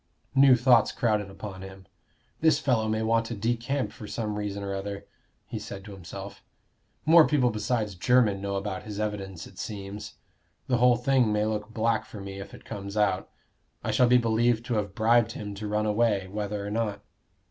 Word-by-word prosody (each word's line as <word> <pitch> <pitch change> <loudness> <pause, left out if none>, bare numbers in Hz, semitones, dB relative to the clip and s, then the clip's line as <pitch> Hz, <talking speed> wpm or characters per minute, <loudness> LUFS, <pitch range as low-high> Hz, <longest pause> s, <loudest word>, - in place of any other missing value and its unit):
New 135 -1 +7
thoughts 125 -1 +4
crowded 105 -4 0
upon 95 -1 -8
him. 95 0 -10 0.5
"This 160 0 +4
fellow 115 -5 +1
may 110 0 0
want 115 0 +2
to 115 - -4
decamp 120 +5 -1
for 105 - -10
some 110 -1 -3
reason 100 -1 -3
or 100 0 -3
other," 100 +1 -5 0.4
he - - -5
said 95 0 -8
to 105 - -9
himself. 95 +1 -9 0.6
"More 160 -1 +7
people 130 -4 +2
besides 105 0 -1
Jermyn 105 0 +3
know 100 0 -2
about 95 -1 -3
his 105 -1 -7
evidence, 100 -4 -4
it - - -14
seems. 105 0 -6 0.5
The 125 - +1
whole 125 0 +5
thing 125 -2 +2
may 105 0 +1
look 105 0 -2
black 115 0 0
for 105 - -10
me 100 0 -7
if 100 - -8
it - - -16
comes 100 +1 -6
out. 100 -3 +1 0.5
I - - -1
shall 125 - +4
be 125 +1 +6
believed 115 0 +2
to 120 - -2
have 105 -2 -2
bribed 115 0 +3
him 105 -1 -6
to 105 +2 -5
run 105 +1 0
away, 105 -3 +1
whether 105 +1 -4
or 100 - -4
not." 105 -2 -2
105 Hz, 190 wpm, -27 LUFS, 100-120 Hz, 0.6 s, New